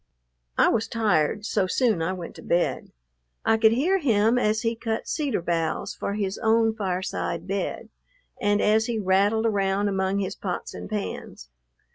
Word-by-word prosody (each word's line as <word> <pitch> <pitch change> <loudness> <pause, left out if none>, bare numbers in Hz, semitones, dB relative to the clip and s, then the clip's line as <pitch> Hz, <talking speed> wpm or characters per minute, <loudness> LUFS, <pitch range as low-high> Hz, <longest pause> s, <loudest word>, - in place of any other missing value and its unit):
I - - +5
was 225 -1 0
tired, 210 -3 +1
so 200 -4 +1
soon 220 -3 +1
I 165 +3 0
went 180 -3 -6
to - - -10
bed. 175 +1 0 0.5
I 225 - +4
could 220 0 +5
hear 345 +11 +2
him 230 - +3
as 215 0 +1
he 230 0 0
cut 225 -1 -3
cedar 285 - -1
boughs 165 -2 -1
for 200 - -4
his 200 -2 -2
own 225 0 +3
fireside 185 -4 -3
bed, 195 +1 -3 0.5
and 205 0 +2
as 220 +2 +3
he 235 -2 -1
rattled 205 +3 +2
around 200 -1 +1
among 190 0 0
his 195 -1 -2
pots 185 -3 -5
and - - -8
pans. 200 - -5
205 Hz, 165 wpm, -25 LUFS, 190-225 Hz, 0.5 s, I